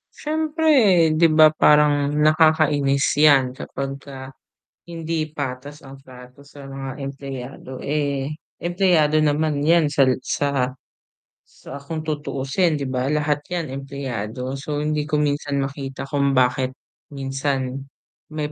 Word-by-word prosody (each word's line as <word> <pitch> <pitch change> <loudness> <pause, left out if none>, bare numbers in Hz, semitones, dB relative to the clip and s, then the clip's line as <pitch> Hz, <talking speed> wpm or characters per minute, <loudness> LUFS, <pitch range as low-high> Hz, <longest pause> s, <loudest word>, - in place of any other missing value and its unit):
Syempre 300 - +2
'di 160 +2 +4
ba? 155 -1 +6
Parang 150 -2 +4
nakakainis 150 -2 +3
yan 140 -4 +5
kapagka 135 0 -7 0.6
hindi 165 -2 -3
patas 145 0 -6
ang 135 0 -12
trato 125 0 -15
sa 140 0 -14
mga 135 0 -7
empleyado. 135 -1 -8
Eh, 140 -1 -1 0.2
empleyado 175 -4 +2
naman 150 0 +1
yan 155 0 +3
sal 135 -3 +3
sa 135 -3 -1 0.8
sa 140 - -11
kung 155 +3 -6
tutuusin 150 +2 -1
'di 145 - -3
ba? 130 -1 -2
Lahat 150 0 0
yan 170 -5 -4
empleyado, 130 -2 -5
so 145 +1 -3
hindi 150 -1 -1
ko 155 - -1
minsan 145 -1 0
makita 135 -1 -6
kung 140 0 0
bakit 130 +1 +1 0.4
minsan 135 -1 -3 0.5
may 150 -1 -3
145 Hz, 120 wpm, -22 LUFS, 135-155 Hz, 0.8 s, ba